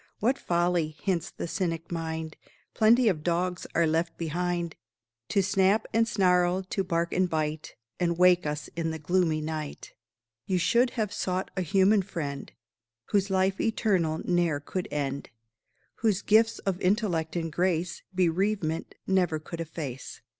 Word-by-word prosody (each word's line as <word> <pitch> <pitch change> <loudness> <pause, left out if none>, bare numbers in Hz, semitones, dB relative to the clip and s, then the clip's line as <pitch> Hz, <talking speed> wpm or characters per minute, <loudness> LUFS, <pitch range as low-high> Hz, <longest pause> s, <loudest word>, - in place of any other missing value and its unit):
"What 255 +6 +1
folly!" 170 -3 0
hints 180 -4 0
the - - -6
cynic 165 -1 -3
mind, 160 -1 -4 0.4
"Plenty 230 +2 +5
of 175 -7 +2
dogs 180 +2 -1
are 170 - +4
left 165 +2 0
behind 170 0 -2 0.5
To 200 - +2
snap 195 +2 +3
and 225 +1 +3
snarl, 180 -3 +2
to 195 - 0
bark 170 -2 -1
and 185 0 +2
bite, 155 -1 -2 0.2
And 170 -2 +1
wake 180 -2 +5
us 150 0 -3
in 165 -1 -1
the 160 - -3
gloomy 160 0 +1
night. 155 -1 -5 0.5
"You 185 - +1
should 235 +8 +3
have 215 -3 -1
sought 185 +1 -2
a 190 - 0
human 195 +4 +4
friend, 150 -7 -5 0.6
Whose 200 0 +2
life 190 0 +1
eternal 185 -8 +1
ne'er 175 -4 +1
could 180 +5 -4
end 140 -1 -3 0.7
Whose 215 -4 +1
gifts 225 +1 +4
of 190 -2 -3
intellect 180 -5 0
and 165 -2 -2
grace 175 0 0
Bereavement 180 -2 0
never 180 -4 +2
could 165 +2 -7
efface." 150 -5 -6
175 Hz, 145 wpm, -28 LUFS, 160-190 Hz, 0.7 s, Plenty